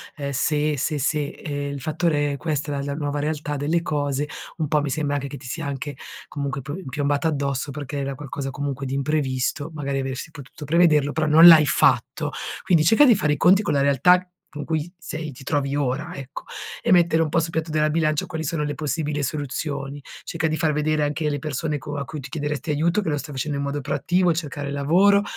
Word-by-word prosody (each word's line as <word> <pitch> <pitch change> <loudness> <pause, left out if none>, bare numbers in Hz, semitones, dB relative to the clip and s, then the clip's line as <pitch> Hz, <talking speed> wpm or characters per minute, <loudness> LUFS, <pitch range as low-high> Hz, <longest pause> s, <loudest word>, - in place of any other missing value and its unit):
ehm, 140 -2 -4
"se, 150 +2 +1
se, 150 +2 -1
se". 145 +1 0
Ehm, 145 -2 -5
il 140 - -5
fattore 150 -1 0
è 140 - -4
questa 150 -2 -2
è - - -2
la 140 - -2
la - - -5
nuova 145 -1 -2
realtà 150 0 -2
delle 155 +4 0
cose, 145 -2 -1 0.3
un 155 -2 -1
po' 150 0 +2
mi 145 - -2
sembra 145 +1 -1
anche 140 -1 -2
che 140 0 -7
ti 130 - -13
sia 155 +5 -4
anche, 140 +1 -4 0.3
comunque, 140 -1 -4
pi 150 +8 -6
piombata 145 +3 0
addosso 140 -2 -1
perché 145 0 -5
era 140 0 -3
qualcosa 140 -1 -5
comunque 140 -1 -4
di 135 - -2
imprevisto, 140 0 -1
magari 140 -2 -2
avresti 135 +4 -4
potuto 145 0 -10
prevederlo, 150 -2 +4
però 155 0 0
non 160 +2 +8
l'hai 155 -3 +9
fatto. - - +2 0.3
Quindi 175 -5 +4
cerca 225 - +6
di 245 -5 +6
fare 150 -6 +1
i 150 - -2
conti 190 +6 +5
con 155 - -1
la 140 - +2
realtà 140 +6 +5
c 185 - -17 0.3
con 150 -1 -5
cui 160 +1 -2
sei 155 -3 -5
ti 135 0 -12
trovi 140 0 0
ora, 145 +5 -1
ecco 135 -3 -8 0.4
e - - +1
mettere 170 -2 +5
un 155 - -2
po' 165 - +2
sul 165 0 -1
piatto 160 -1 -2
della 155 0 +2
bilancia 155 -1 +1
quali 160 0 -4
sono 160 +1 -2
le 145 0 -2
possibile 150 0 -2
soluzioni. 140 0 -3 0.2
Cerca 165 -1 -3
di 155 - -1
far 155 -2 +1
vedere 150 +1 +1
anche 150 +1 0
le 145 -1 -1
persone 150 +1 -2
co 145 +2 -6
a 140 - -3
cui 150 +2 -7
tu 135 0 -8
chiederesti 150 0 -3
aiuto 165 +7 +2
che 180 - -2
lo 145 - 0
stai 145 +1 -7
facendo 140 +2 -2
in 140 - -2
modo 140 +1 -2
proattivo, 175 +6 +1
cercare 145 -3 -3
lavoro 180 +9 +4
150 Hz, 225 wpm, -23 LUFS, 140-160 Hz, 0.4 s, l'hai